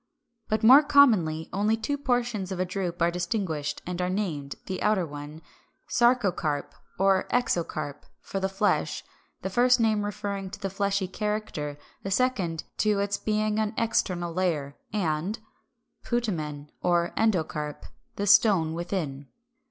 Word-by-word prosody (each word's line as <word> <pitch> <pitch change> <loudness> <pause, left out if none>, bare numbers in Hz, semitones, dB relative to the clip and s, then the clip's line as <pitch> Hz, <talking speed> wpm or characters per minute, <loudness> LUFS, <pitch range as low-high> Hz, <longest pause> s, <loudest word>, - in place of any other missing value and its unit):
But 215 +1 0
more 260 +6 +9
commonly 220 - +4
only 210 +3 +2
two 255 +6 -2
portions 245 -8 -1
of 185 - -3
a 185 - +1
drupe 180 -2 -2
are 170 - +3
distinguished, 170 -5 -2
and 180 0 -3
are 180 - 0
named, 165 -8 -2
the 190 - -4
outer 210 -4 +2
one 150 +1 -9 0.5
Sarcocarp 195 - +2 0.2
or 195 0 +3
Exocarp, 165 - -1
for 195 - -4
the 190 0 0
flesh, 195 +2 0 0.4
the 190 - -1
first 245 +4 +4
name 215 -2 +2
referring 200 -1 -4
to 195 - -9
the 195 -2 -3
fleshy 200 0 0
character, 210 -8 -3 0.2
the 195 - -4
second 195 -8 0 0.2
to 210 -1 +3
its 200 0 0
being 215 0 0
an 215 0 -1
external 180 -6 0
layer; 160 -6 -1 0.2
and 185 0 -1 0.7
Putamen 155 -12 -2
or 175 -1 +2
Endocarp, 160 -8 0 0.3
the 200 - -2
Stone, 200 -6 +5
within. 165 -5 -3
190 Hz, 140 wpm, -27 LUFS, 165-215 Hz, 0.7 s, more